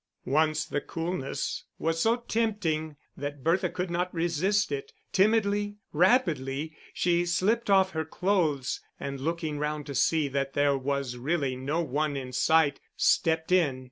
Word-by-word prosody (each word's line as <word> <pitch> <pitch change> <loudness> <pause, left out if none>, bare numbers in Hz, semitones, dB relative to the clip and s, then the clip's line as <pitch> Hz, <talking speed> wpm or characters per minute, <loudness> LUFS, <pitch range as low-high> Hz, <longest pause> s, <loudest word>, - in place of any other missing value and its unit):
Once 155 +3 +2
the 145 - -2
coolness 165 -4 -3
was 165 0 -1
so 225 +4 +4
tempting 205 -10 -1 0.2
that 145 -1 -6
Bertha 165 +3 +2
could 180 -1 -3
not 180 +1 -1
resist 175 +5 +1
it. 430 +1 -4 0.2
Timidly, 205 0 +2 0.2
rapidly, 155 - +2 0.2
she 175 0 +1
slipped 205 +6 +1
off 190 -1 +5
her 160 -2 -2
clothes 160 -5 0 0.2
and 140 -1 -4
looking 160 -1 -2
round 150 0 -2
to 140 - -6
see 150 +3 +2
that 135 0 -2
there 145 -1 +3
was 135 -2 -2
really 140 0 -1
no 140 +6 -1
one 150 -1 -1
in 130 -1 -6
sight, 155 +1 +3 0.2
stepped 160 +1 +2
in. 155 -8 +3
160 Hz, 145 wpm, -28 LUFS, 145-185 Hz, 0.2 s, off